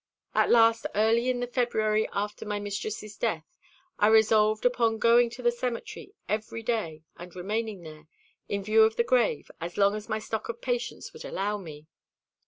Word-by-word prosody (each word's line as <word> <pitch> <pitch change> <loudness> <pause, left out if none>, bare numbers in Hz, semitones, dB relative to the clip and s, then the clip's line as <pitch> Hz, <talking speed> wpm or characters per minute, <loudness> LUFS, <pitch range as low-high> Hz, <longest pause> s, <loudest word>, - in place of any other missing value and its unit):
At - - +3
last, 230 -1 +4
early 225 +4 +3
in 245 -1 -1
the - - 0
February 220 -3 0
after 205 +1 -3
my 210 -1 -3
mistress's 205 +1 -5
death, - - -1 0.5
I 205 - +5
resolved 215 0 +4
upon 235 -2 +2
going 235 +1 +4
to 250 +2 -10
the 240 - +4
cemetery 245 - -5
every 220 +2 -3
day, 190 -10 -2
and 175 0 -11
remaining 205 +1 -3
there, 155 -1 -12 0.4
in 200 -1 -2
view 215 +2 +4
of 220 0 +4
the 235 - +2
grave, 235 - +1
as 170 +1 -6
long 200 0 +4
as 215 0 -6
my 215 - 0
stock 220 +1 -5
of 235 0 -5
patience 245 0 -4
would - - -10
allow 205 +2 -2
me. 155 -5 -10
220 Hz, 180 wpm, -27 LUFS, 205-235 Hz, 0.5 s, I